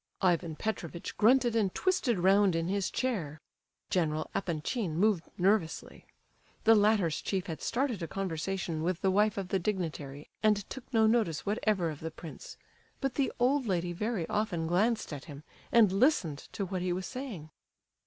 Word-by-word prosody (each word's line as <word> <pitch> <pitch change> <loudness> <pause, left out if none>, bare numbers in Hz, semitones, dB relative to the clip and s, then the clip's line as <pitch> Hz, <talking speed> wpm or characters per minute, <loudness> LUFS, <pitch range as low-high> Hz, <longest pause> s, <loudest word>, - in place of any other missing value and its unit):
Ivan 170 -3 +2
Petrovitch 170 -4 -4
grunted 240 +1 +4
and 205 -4 +2
twisted 360 - +1
round 190 +1 +4
in 165 +1 -1
his 200 0 0
chair. 175 - -2 0.5
General 155 -4 0
Epanchin 170 +1 -2
moved 195 -3 +2
nervously. 185 -3 0 0.6
The 225 - +7
latter's 205 -7 +3
chief 190 -2 -2
had 160 -3 -6
started 240 -5 -1
a 165 - -3
conversation 180 -2 -3
with 175 +1 -1
the 190 - +3
wife 210 +1 +2
of 190 -2 -3
the 195 - +1
dignitary, 155 -7 -3
and 210 -2 +2
took 265 -1 -8
no 225 -3 +4
notice 220 -8 +1
whatever 200 -5 0
of 150 - -8
the 160 - -4
prince, 160 -1 -10 0.4
but 270 -2 -1
the 275 -2 0
old 255 +1 +2
lady 175 -2 0
very 210 -2 -2
often 205 -6 -1
glanced 205 +3 +1
at 140 - -7
him, 145 -3 -10 0.3
and 225 -5 +6
listened 195 - +1
to 200 - -2
what 185 -1 -3
he 180 0 -1
was 185 +1 -2
saying. 215 - -7
190 Hz, 165 wpm, -30 LUFS, 165-220 Hz, 0.6 s, The